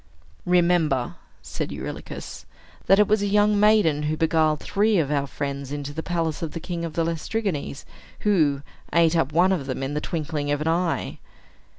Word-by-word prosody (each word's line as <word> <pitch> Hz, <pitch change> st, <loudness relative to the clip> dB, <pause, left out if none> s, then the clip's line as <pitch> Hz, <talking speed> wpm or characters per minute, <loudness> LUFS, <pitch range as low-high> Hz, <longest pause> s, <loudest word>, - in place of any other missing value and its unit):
"Remember," 170 Hz, -7 st, +2 dB, 0.3 s
said -, -, -5 dB
Eurylochus, -, -, -7 dB, 0.4 s
"that 195 Hz, -, +6 dB
it 210 Hz, 0 st, +5 dB
was 215 Hz, 0 st, +2 dB
a 205 Hz, -, 0 dB
young 205 Hz, 0 st, +3 dB
maiden 210 Hz, -8 st, +4 dB
who 150 Hz, +1 st, -1 dB
beguiled 160 Hz, -1 st, +2 dB
three 210 Hz, +1 st, +1 dB
of 150 Hz, -4 st, +1 dB
our 140 Hz, -1 st, 0 dB
friends 140 Hz, -1 st, -5 dB
into 145 Hz, 0 st, -5 dB
the 160 Hz, -, -4 dB
palace 165 Hz, -3 st, -2 dB
of 165 Hz, -2 st, -4 dB
the 165 Hz, -, -4 dB
king 170 Hz, 0 st, -5 dB
of 165 Hz, -2 st, -4 dB
the 165 Hz, -, 0 dB
Laestrygons, 165 Hz, -2 st, -3 dB, 0.4 s
who 155 Hz, -9 st, +2 dB, 0.3 s
ate 165 Hz, +1 st, +3 dB
up 160 Hz, -4 st, +1 dB
one 175 Hz, +5 st, +4 dB
of 155 Hz, -8 st, -1 dB
them 130 Hz, 0 st, -3 dB
in 135 Hz, +2 st, -3 dB
the 150 Hz, -, -2 dB
twinkling 155 Hz, -3 st, -3 dB
of 145 Hz, -, 0 dB
an 155 Hz, -, -2 dB
eye." 170 Hz, +1 st, -1 dB
160 Hz, 185 wpm, -24 LUFS, 145-180 Hz, 0.4 s, that